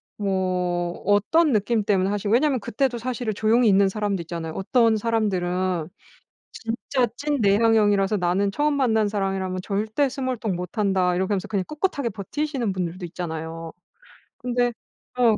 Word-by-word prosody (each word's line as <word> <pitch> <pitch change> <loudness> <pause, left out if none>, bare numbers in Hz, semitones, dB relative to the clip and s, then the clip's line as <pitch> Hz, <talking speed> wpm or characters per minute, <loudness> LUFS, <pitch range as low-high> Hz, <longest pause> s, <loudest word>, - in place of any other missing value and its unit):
뭐 180 -3 -1
어떤 250 - +3
느낌 215 +1 +1
때문에 195 -2 +2
하시고 205 0 -2
왜냐면 270 +1 +3
그때도 240 +4 -1
사실은 245 -2 -3
조용히 225 +3 +3
있는 195 -1 +5
사람도 205 -3 -2
있잖아요. 165 -1 -5
어떤 225 +3 +3
사람들은 185 -6 0 0.6
진짜 245 +2 -1
찐 290 +1 -1
내향형이라서 205 -1 +3
"나는 190 +3 +1
처음 295 +3 +1
만난 220 -6 +2
사람이라면 195 -2 -2
절대 215 +8 0
스몰토크 255 -7 -2
못 180 +5 -6
한다." 190 -3 +2
이렇게 190 +3 0
하면서 190 -3 -2
그냥 200 -3 -1
꿋꿋하게 295 -6 -1
버티시는 245 - -3
분들도 180 0 -3
있잖아요. 165 -1 -6 0.7
근데 245 -1 0 0.5
어 230 -3 +4
205 Hz, 365 characters per minute, -24 LUFS, 185-235 Hz, 0.7 s, 있는